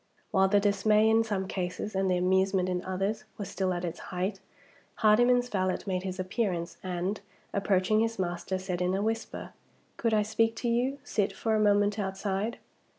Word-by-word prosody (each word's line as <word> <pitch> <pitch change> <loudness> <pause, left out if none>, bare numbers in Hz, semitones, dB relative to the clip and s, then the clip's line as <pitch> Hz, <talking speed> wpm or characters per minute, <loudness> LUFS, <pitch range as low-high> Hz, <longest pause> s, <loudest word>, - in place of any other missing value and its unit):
While 190 -2 +4
the 205 +1 +4
dismay, 210 +2 +3
in 225 +1 +4
some 200 -4 -2
cases, 185 +2 -3
and 190 0 +1
the 180 - +2
amusement 190 +1 +2
in 180 -1 -1
others, 195 +3 -2
was 200 -3 -5
still 185 0 -1
at 175 0 -2
its 170 0 -5
height, 190 +2 -2 0.6
Hardyman's 245 +3 +4
valet 185 -5 0
made 185 -2 -1
his 185 0 -5
appearance, 185 -2 -2
and, 185 +2 -3 0.3
approaching 200 +1 +2
his 225 0 0
master, 175 0 -2
said 185 -1 -3
in 180 +1 +1
a 200 - 0
whisper, 225 +1 -3 0.4
"Could 230 -2 +1
I 210 - +3
speak 225 +1 +1
to 240 - -3
you, 245 +4 +1
sit, 210 -8 0
for 225 - -1
a 215 - +3
moment 205 0 +3
outside?" 195 +3 -2
195 Hz, 180 wpm, -29 LUFS, 185-215 Hz, 0.6 s, While